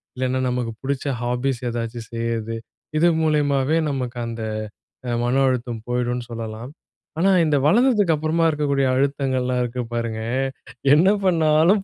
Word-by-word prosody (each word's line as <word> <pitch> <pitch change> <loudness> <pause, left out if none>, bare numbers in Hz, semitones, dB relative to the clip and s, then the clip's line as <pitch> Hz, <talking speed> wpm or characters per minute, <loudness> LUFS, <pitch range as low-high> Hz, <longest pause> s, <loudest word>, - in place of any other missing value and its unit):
இல்லைன்னா 130 0 -1
நமக்கு 125 -2 -2
புடிச்ச 140 +1 -2 0.2
ஹாபீஸ் 125 +1 -1
ஏதாச்சும் 115 -1 -4
செய்றது. 115 -1 -2 0.4
இது 170 +3 +4 0.2
மூலியமாவே 145 -1 +2
நமக்கு 125 -3 -3
அந்த 115 -1 -5 0.7
அ - - -1
மன 120 +2 +1
அழுத்தம் 120 -3 -2
போயிடும்னு 125 0 -1
சொல்லலாம். 115 +3 -6 0.5
ஆனா, 195 +3 +4 0.2
இந்த 150 -1 +2
வளர்ந்ததுக்கு 210 -3 +4
அப்புறமா 155 +2 0
இருக்கக்கூடிய 140 -3 +1
அழுத்தங்கள்லாம் 130 -2 0
இருக்கு 125 +1 -3
பாருங்க, 115 -1 -2 0.7
என்ன 165 +5 +5 0.2
பண்ணாலும் 165 +3 +4
130 Hz, 125 wpm, -22 LUFS, 120-150 Hz, 0.7 s, என்ன